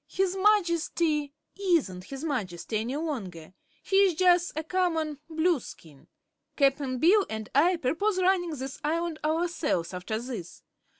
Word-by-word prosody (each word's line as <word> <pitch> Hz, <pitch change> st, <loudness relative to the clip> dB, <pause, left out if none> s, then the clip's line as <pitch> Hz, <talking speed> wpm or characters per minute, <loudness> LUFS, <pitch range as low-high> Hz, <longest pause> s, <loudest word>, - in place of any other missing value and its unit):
"His 380 Hz, -1 st, 0 dB
Majesty 340 Hz, -7 st, +2 dB, 0.3 s
isn't 280 Hz, -, +1 dB
his 275 Hz, +5 st, -8 dB
Majesty 215 Hz, -, -3 dB
any 240 Hz, +5 st, -3 dB
longer; 195 Hz, -, -5 dB, 0.3 s
he's 390 Hz, -3 st, +3 dB
jus' 355 Hz, 0 st, +4 dB
a 315 Hz, -, -2 dB
common 320 Hz, -4 st, -1 dB
Blueskin. 315 Hz, -, -2 dB, 0.5 s
Cap'n 275 Hz, -2 st, +1 dB
Bill 375 Hz, -, +5 dB
and 220 Hz, -1 st, -6 dB
I 335 Hz, +7 st, +4 dB
perpose 350 Hz, +7 st, 0 dB
runnin' 360 Hz, -4 st, +1 dB
this 265 Hz, +2 st, -6 dB
Island 330 Hz, +1 st, -1 dB
ourselves, 310 Hz, -, -1 dB
after 180 Hz, +5 st, -3 dB
this. 230 Hz, -8 st, -7 dB
310 Hz, 125 wpm, -28 LUFS, 250-350 Hz, 0.5 s, Bill